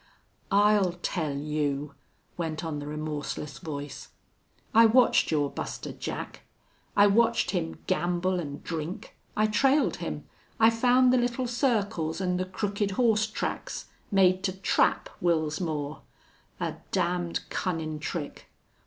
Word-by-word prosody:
"I'll 205 -2 +4
tell 155 -6 -1
you 145 -1 -2 0.2
..." - - -40
went 165 -1 -3
on 155 -2 -3
the 145 - -6
remorseless 150 -1 -4
voice. 145 -4 -6 0.7
"I 230 +1 +8
watched 245 +2 +4
your 145 -3 +1
Buster - - -5
Jack. - - -6 0.6
I 205 - +8
watched 220 +3 +3
him 170 -4 -2
gamble 180 0 0
an' 145 -3 -6
drink. 165 +2 -5 0.2
I 215 - +4
trailed 270 +7 +3
him. - - -5 0.4
I 225 0 +7
found 250 +2 +4
the 255 - +4
little 245 +1 0
circles 220 - 0
an' 180 -1 0
the 185 - -1
crooked 200 +2 -2
horse 220 -3 +3
tracks 220 - -4 0.2
made 185 -2 +4
to 185 - 0
trap 190 -1 +2
Wils 160 -2 +1
Moore.... 150 -3 -3 0.6
A - - -3
damned 175 -2 0
cunnin' 160 -4 -2
trick!... 155 -1 -5
180 Hz, 135 wpm, -28 LUFS, 155-215 Hz, 0.7 s, I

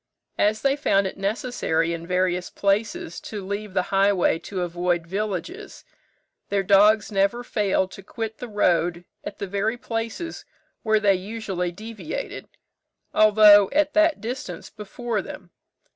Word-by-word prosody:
As 215 +1 +2
they 275 0 +3
found 200 -9 +2
it 190 - -4
necessary 195 -5 -1
in 170 0 -6
various 180 0 0
places 225 - -1
to 205 -3 -7
leave 200 0 -5
the 185 - +2
highway 195 -4 +3
to 185 0 -4
avoid 175 0 -1
villages, 210 - -5 0.6
their 200 -1 +1
dogs 210 +3 +4
never 200 +4 +1
failed 195 -5 0
to - - -10
quit 220 +2 -6
the 245 - -6
road 175 -4 +1 0.2
at - - -7
the - - -4
very 200 +4 -1
places 230 +9 -5 0.4
where 220 -1 +2
they 205 -2 +4
usually 190 -2 -3
deviated, 225 - -7 0.7
although 210 -2 +7
at 300 0 +2
that 315 -5 +3
distance 245 +5 -6
before 215 +1 -4
them. 180 -1 -10
205 Hz, 140 wpm, -24 LUFS, 185-225 Hz, 0.7 s, although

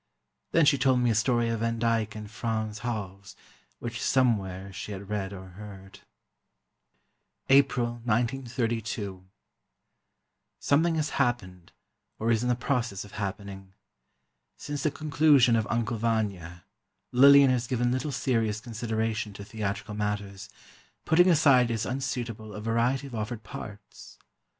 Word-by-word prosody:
Then 165 - +4
she 145 -2 +4
told 130 -1 +3
me 120 -1 +2
a - - +2
story 120 +2 +2
of 115 -1 -1
Van 115 0 -1
Dyck 115 -2 0
and 105 -1 -7
Frans 110 0 -3
Hals, 100 -4 -5 0.4
which 120 0 -6
somewhere 100 -7 0
she 100 +3 -6
had 100 +1 -8
read, 100 -2 -2
or 95 -1 -9
heard. 95 0 -11 1.5
April, 125 -4 +3
1932. 115 -5 -2 1.4
Something 160 +4 +2
has 155 -1 0
happened, 95 -9 -2 0.5
or 115 +2 0
is 115 -1 +2
in 125 - -1
the 125 - +3
process 120 -6 -2
of 100 - -14
happening. 95 -1 -6 0.8
Since 145 -1 -5
the 155 - +2
conclusion 145 -5 +4
of 110 -2 0
"Uncle 115 0 -1
Vanya" 100 -7 -2 0.5
Lillian 140 +1 +7
has 125 -1 0
given 120 -1 0
little 130 +4 -1
serious 115 -5 0
consideration 110 -1 -3
to 100 +1 -9
theatrical 105 0 -4
matters, 105 -1 -4 0.6
putting 175 +3 +5
aside 140 -7 +5
as 115 -2 -1
unsuitable 120 -5 -4
a - - -5
variety 115 +5 0
of 135 - -10
offered 110 0 -4
parts. 105 0 -10
115 Hz, 135 wpm, -27 LUFS, 105-125 Hz, 1.5 s, Lillian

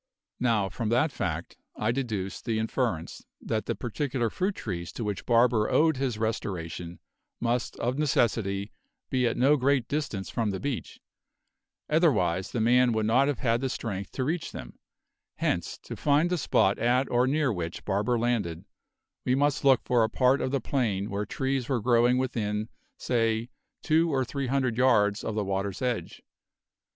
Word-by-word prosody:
Now, 115 -5 +2
from 110 +4 -3
that 125 +7 +2
fact - - -4 0.2
I 110 +2 0
deduced 110 -7 -3
the 115 -2 0
inference 110 -6 -2 0.2
that 110 -1 -3
the - - -1
particular 120 -1 -2
fruit 190 +2 -1
trees 85 -6 -5
to - - -4
which 105 -2 -4
Barber 115 -2 +4
owed 160 -2 +3
his 130 -4 -1
restoration 90 -6 -3 0.4
must 120 0 -1
of 125 +4 -2
necessity 105 -8 +1 0.4
be 125 -2 +2
at 115 - -1
no 140 +4 +4
great 135 -2 +2
distance 140 -10 -3
from 115 -3 0
the 95 -2 -3
beach, 140 -3 -4 0.9
otherwise 105 - +2
the 120 - -2
man 120 +2 +4
would 110 -1 0
not 125 +5 +4
have 145 -6 -2
had 120 +2 +1
strength 100 -6 -4
to 130 - -2
reach 160 +5 -2
them; - - -9 0.6
hence, 85 -2 -1
to - - -7
find 150 +4 +2
the 180 - +1
spot 100 -7 +2
at 125 +3 +2
or 125 +1 +3
near 145 -2 +1
which 85 -2 -5
Barber 105 +5 +1
landed, 110 -9 -1 0.6
we 125 - +2
must 145 +1 +1
look 135 -3 +5
for 120 -2 +3
a 110 - +1
part 130 +3 +3
of - - 0
the 140 +1 0
plain 110 -6 -1
where 100 0 -2
trees 135 0 -2
were 130 -3 +1
growing 120 +2 +3
within, 110 -4 -2 0.3
say, 115 -1 0 0.3
two 165 +2 +3
or 130 -2 +1
three 135 +2 -3
hundred 130 -3 0
yards 105 -5 +3
of 110 - -3
the 105 -2 -1
water's 95 0 -2
edge. 125 -3 -3
120 Hz, 170 wpm, -28 LUFS, 105-130 Hz, 0.9 s, look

